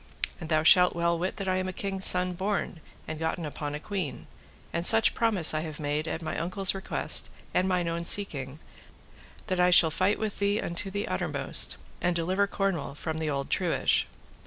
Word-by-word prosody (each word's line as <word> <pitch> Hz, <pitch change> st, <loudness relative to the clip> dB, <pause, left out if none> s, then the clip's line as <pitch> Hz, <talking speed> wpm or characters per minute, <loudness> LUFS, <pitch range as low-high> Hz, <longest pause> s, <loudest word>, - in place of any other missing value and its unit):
And 160 Hz, -3 st, -8 dB
thou 155 Hz, -1 st, +2 dB
shalt 180 Hz, +2 st, +6 dB
well 170 Hz, 0 st, 0 dB
wit 185 Hz, +2 st, -3 dB
that 195 Hz, -, -5 dB
I 185 Hz, 0 st, +1 dB
am 185 Hz, 0 st, -2 dB
a -, -, -3 dB
king's 195 Hz, -1 st, -1 dB
son 180 Hz, 0 st, +3 dB
born, 190 Hz, -2 st, -3 dB, 0.3 s
and 155 Hz, -1 st, -6 dB
gotten 160 Hz, +1 st, -3 dB
upon 145 Hz, 0 st, -5 dB
a -, -, -5 dB
queen; 185 Hz, -4 st, -5 dB, 0.5 s
and 170 Hz, -, -2 dB
such 225 Hz, +4 st, +6 dB
promise 210 Hz, -10 st, +3 dB
I 155 Hz, -, 0 dB
have 155 Hz, -2 st, -7 dB
made 150 Hz, +1 st, -2 dB
at 165 Hz, +1 st, -4 dB
my 155 Hz, -, -4 dB
uncle's 185 Hz, +3 st, +2 dB
request 195 Hz, +1 st, 0 dB, 0.2 s
and 185 Hz, -, +1 dB
mine 180 Hz, -2 st, 0 dB
own 170 Hz, 0 st, -3 dB
seeking, 145 Hz, -9 st, +1 dB, 0.9 s
that 185 Hz, -1 st, -2 dB
I 180 Hz, 0 st, +4 dB
shall 170 Hz, -2 st, +7 dB
fight 185 Hz, +6 st, +1 dB
with 215 Hz, -2 st, -4 dB
thee 200 Hz, +1 st, +1 dB
unto 170 Hz, +3 st, -4 dB
the 205 Hz, +2 st, -4 dB
uttermost, -, -, 0 dB, 0.2 s
and 175 Hz, -1 st, 0 dB
deliver 185 Hz, +4 st, 0 dB
Cornwall 190 Hz, -9 st, -3 dB
from 160 Hz, +1 st, -5 dB
the 160 Hz, -1 st, -2 dB
old 140 Hz, -1 st, -4 dB
truage. -, -, +1 dB
175 Hz, 195 wpm, -27 LUFS, 160-195 Hz, 0.9 s, shall